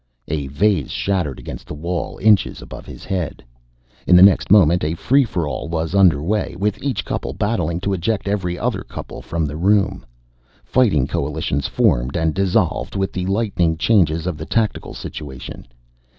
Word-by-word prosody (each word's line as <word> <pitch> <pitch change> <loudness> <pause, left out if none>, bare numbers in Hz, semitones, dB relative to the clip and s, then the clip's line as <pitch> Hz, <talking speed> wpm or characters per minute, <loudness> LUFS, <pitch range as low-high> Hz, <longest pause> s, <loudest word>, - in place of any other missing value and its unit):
A 75 -2 -2
vase 100 +9 +1
shattered 90 -9 -1
against - - -9
the - - -6
wall, 85 +3 -4
inches 105 -1 +3
above - - -10
his - - -10
head. 90 -5 -3 0.6
In 90 - +6
the 90 - +9
next 100 -1 +5
moment, 90 -5 +5
a 80 +2 -1
free 135 +10 +3
for 90 - -2
all 70 +3 -4
was 80 0 -2
under 90 -7 +4
way, 105 +4 -1
with 105 +2 -1
each 140 -2 -2
couple - - -3
battling 90 -6 -1
to 100 +1 -1
eject 95 +3 -1
every 95 -3 -1
other - - -1
couple - - -8
from 80 -1 -2
the 75 +1 -5
room. 100 +3 +2 0.6
Fighting 100 - +2
coalitions 70 0 -2
formed 65 +6 +1
and 80 -1 +1
dissolved 95 0 0
with 95 -1 -1
the 90 0 -3
lightning 95 -5 0
changes 85 -5 +2
of 90 -4 -2
the 80 - -6
tactical 110 -2 -1
situation. 65 -4 -8
90 Hz, 170 wpm, -20 LUFS, 80-100 Hz, 0.6 s, the